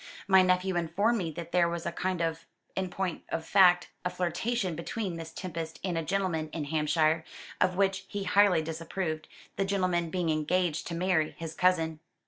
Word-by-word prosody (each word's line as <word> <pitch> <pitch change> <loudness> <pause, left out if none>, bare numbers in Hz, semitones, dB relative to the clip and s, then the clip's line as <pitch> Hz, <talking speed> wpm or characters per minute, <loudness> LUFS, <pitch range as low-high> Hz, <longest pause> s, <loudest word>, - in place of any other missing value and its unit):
My 190 -1 +7
nephew 185 0 +2
informed 200 +8 +1
me 170 -4 -2
that 170 +2 -7
there 175 -1 +3
was 170 0 -4
a - - -1
kind 185 0 -2
of 165 0 -2 0.3
in 190 -1 -1
point 185 -2 -3
of 160 - -3
fact 180 -3 +5
a 180 - 0
flirtation 180 +2 -1
between 180 +3 -3
Miss 165 -1 -7
Tempest 165 -3 -6
and 185 -3 -1
a 165 - 0
gentleman 165 -3 -1
in 160 - -2
Hampshire, 155 +1 +2 0.4
of 185 0 +3
which 195 0 +1
he 205 -1 -4
highly 195 -5 +4
disapproved, 160 0 -4 0.3
the 195 - +2
gentleman 185 -4 0
being 175 -1 0
engaged 160 +2 0
to 170 - -4
marry 175 -3 +1
his 165 -1 -6
cousin." 165 -3 +2
175 Hz, 180 wpm, -29 LUFS, 165-185 Hz, 0.4 s, My